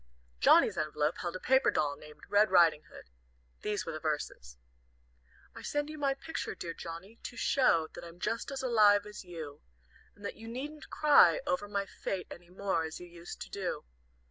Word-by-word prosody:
Johnnie's - - +5
envelope 150 +1 0
held 175 0 -3
a - - -4
paper 265 +6 +4
doll 145 -1 +1
named 150 +1 -14
"Red 205 +1 +4
Riding 170 -4 +5
Hood." 60 - -14 0.5
These 210 -1 -2
were 165 - -3
the 155 - -5
verses: 145 - -4 1.0
"I - - -10
send 290 +1 -2
you 310 - -8
my 275 -1 +1
picture, 320 +4 -5
dear 170 -1 -5
Johnnie, 170 +8 -8
to 245 - -8
show 165 - +3
That - - -9
I'm 170 +1 -11
just 230 +7 -2
as 275 -1 -4
alive 210 -4 +5
as 210 -1 -9
you, 160 -5 -8 0.5
And 205 - -12
that - - -5
you 225 - -10
needn't 290 +6 -6
cry 300 +10 +6
over 240 -7 -1
my 200 -1 -1
fate 190 -1 -4
Any 175 0 -11
more, 190 -2 -1
as 160 0 -6
you 180 - -9
used 170 0 -10
to - - -7
do. 190 - -3
190 Hz, 190 wpm, -32 LUFS, 165-230 Hz, 1.0 s, cry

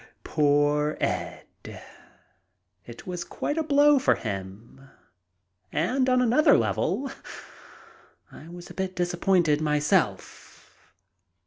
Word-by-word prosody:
Poor 150 0 +1
Ed! - - -3 1.4
It 120 -1 -11
was 180 -1 -5
quite 295 +2 -4
a - - 0
blow 290 -1 +4
for - - +2
him, 105 +6 -8 0.8
and, 255 - 0
on 255 - +3
the 255 +7 +4
level, 270 +1 -1 1.2
I 160 - -13
was 175 0 -11
a - - -10
bit 190 -1 -4
disappointed 175 -3 +1
myself. 150 - -2
170 Hz, 100 wpm, -25 LUFS, 145-235 Hz, 1.4 s, blow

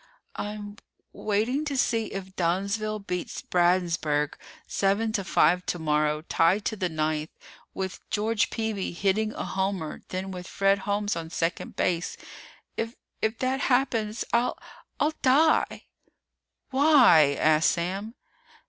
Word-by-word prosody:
"I'm 205 0 -6 0.4
w - - -12
waiting 225 +8 +1
to 285 -3 -2
see 225 -3 +1
if 190 -1 -7
Dunnsville 200 +5 0
beats 180 -2 -4
Bradensburg 170 -5 +1 0.3
seven 200 +3 +1
to 205 -3 -1
five 180 -1 +3
tomorrow, 150 -2 0
tied 175 +5 +2
to 220 - -1
the 185 -3 -1
ninth, 155 0 -1 0.5
with 190 -1 -4
George 220 +1 +1
Peeby 220 -5 -3
hitting 205 +4 +1
a - - -4
homer 190 -5 -2
then 190 +1 -4
with 180 -1 -7
Fred 195 0 +2
Holmes 205 0 0
on 165 -1 -5
second 165 0 -2
base. 175 -1 -1 0.6
If 225 +1 -3 0.3
if 220 +1 0
that 260 +1 0
happens, 235 -5 +1
I'll 235 +1 +2 0.4
I'll 305 +1 +2
die!" 300 +4 +3 0.9
"Why?" 255 - +6
asked 155 0 +4
Sam. 195 +7 -3
195 Hz, 130 wpm, -27 LUFS, 170-220 Hz, 0.9 s, Why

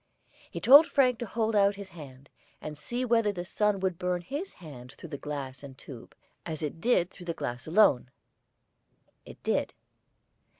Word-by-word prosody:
He - - -6
told 285 +5 +8
Frank 255 -4 +2
to 240 - -4
hold 220 +1 -1
out 200 0 +4
his 200 -1 -9
hand, 140 -6 -12 0.3
and 155 0 -7
see 240 +12 -3
whether 230 -3 +2
the 180 -3 -6
sun 210 +1 0
would 185 -2 -1
burn 180 -1 -1
his 290 - -6
hand 130 -8 -12
through 170 - -11
the 145 - -5
glass 135 -3 -6
and 135 -2 -11
tube, 125 -4 -12 0.3
as 160 -2 -5
it 155 +2 -5
did 190 -6 +2
through 175 - -13
the 170 - -2
glass 120 +3 -5
alone. 160 - +4 1.2
It - - -13
did. - - -1
175 Hz, 175 wpm, -28 LUFS, 145-215 Hz, 1.2 s, told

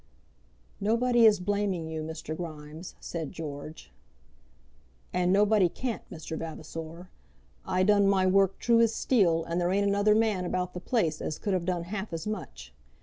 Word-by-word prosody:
"Nobody 235 +2 +4
is 210 -2 +4
blaming 195 -3 -1
you, 160 -1 -4
Mr. 155 0 -5
Grimes," 155 0 -8
said 165 -3 -5
George. 150 - -8 1.2
"And 180 0 +2
nobody 200 -1 +4
can't, 240 +4 -4
Mr. 160 -2 -7
Vavasor. 165 +2 -7 0.6
I 185 0 +2
done 205 0 +4
my 195 -1 +3
work 195 0 +3
true 235 -1 +3
as 230 -1 +3
steel, 175 -10 +2
and 170 +2 -2
there 175 - +1
ain't 200 +1 +2
another 205 +1 +3
man 215 -4 +1
about 180 0 -2
the 180 - -5
place 175 -8 0
as 155 - -3
could 205 - -2
have 180 -2 0
done 175 -2 -1
half 195 +3 -5
as 165 -1 -4
much. 65 - -6
180 Hz, 160 wpm, -28 LUFS, 160-205 Hz, 1.2 s, Nobody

